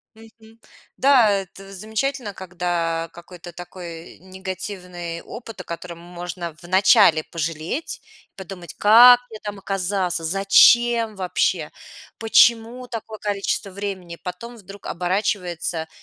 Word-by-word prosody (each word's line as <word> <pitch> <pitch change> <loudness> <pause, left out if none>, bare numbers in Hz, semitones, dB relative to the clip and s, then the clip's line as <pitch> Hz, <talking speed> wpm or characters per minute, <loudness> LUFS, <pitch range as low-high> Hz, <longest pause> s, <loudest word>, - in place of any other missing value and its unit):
Мгм. 225 0 -18 0.4
Да. 260 -5 +5
Это 195 0 -4
замечательно, 220 +3 -3
когда 175 -3 -2
какой-то 175 0 -12
такой 170 -1 -10
негативный 185 -2 -7
опыт, 225 -4 -10
о - - -24
котором 170 0 -7
можно 175 -1 -7
вначале 185 -2 +5
пожалеть 165 - -4 0.3
и - - -56
подумать: 185 -2 -9
"Как 240 +4 +8
я 220 - -8
там 205 -1 -6
оказаться, 190 -2 -2
зачем 220 +5 +4
вообще, 185 -2 -1 0.5
почему 230 +2 +3
такое 220 -2 -7
количество 200 0 -2
времени?" 185 -3 -6
Потом 230 +7 -7
вдруг 200 -2 -13
оборачивается 180 -3 -2
190 Hz, 110 wpm, -22 LUFS, 175-220 Hz, 0.5 s, Как